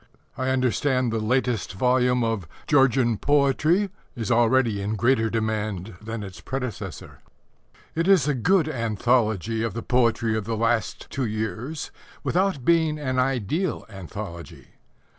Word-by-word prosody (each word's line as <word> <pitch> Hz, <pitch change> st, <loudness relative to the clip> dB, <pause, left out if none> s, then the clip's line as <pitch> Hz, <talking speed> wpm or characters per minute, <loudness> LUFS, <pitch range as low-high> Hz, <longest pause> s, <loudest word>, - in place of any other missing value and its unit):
I 130 Hz, 0 st, -1 dB
understand 130 Hz, -1 st, +1 dB
the 110 Hz, -, 0 dB
latest 120 Hz, -2 st, 0 dB
volume 125 Hz, +3 st, +2 dB
of 110 Hz, -7 st, -1 dB, 0.2 s
Georgian 130 Hz, -5 st, +3 dB
Poetry 150 Hz, +7 st, +2 dB, 0.2 s
is 120 Hz, -1 st, -3 dB
already 115 Hz, -2 st, +3 dB
in 105 Hz, +2 st, -2 dB
greater 115 Hz, 0 st, +2 dB
demand 110 Hz, -3 st, -2 dB
than 110 Hz, 0 st, -5 dB
its 95 Hz, -2 st, -9 dB
predecessor. 125 Hz, -8 st, -6 dB, 0.7 s
It 165 Hz, +2 st, 0 dB
is 185 Hz, -8 st, +5 dB
a 150 Hz, -, +2 dB
good 160 Hz, -, +2 dB
anthology 115 Hz, -, 0 dB
of 115 Hz, -3 st, -2 dB
the 115 Hz, -, -4 dB
poetry 115 Hz, -2 st, +2 dB
of 110 Hz, -2 st, -2 dB
the 115 Hz, 0 st, -2 dB
last 115 Hz, -2 st, 0 dB
two 130 Hz, -, -1 dB
years 110 Hz, +7 st, -4 dB, 0.3 s
without 185 Hz, -8 st, 0 dB
being 160 Hz, -2 st, +3 dB
an 130 Hz, -4 st, -1 dB
ideal 135 Hz, -, -1 dB
anthology. 95 Hz, -2 st, -8 dB
120 Hz, 135 wpm, -24 LUFS, 110-135 Hz, 0.7 s, is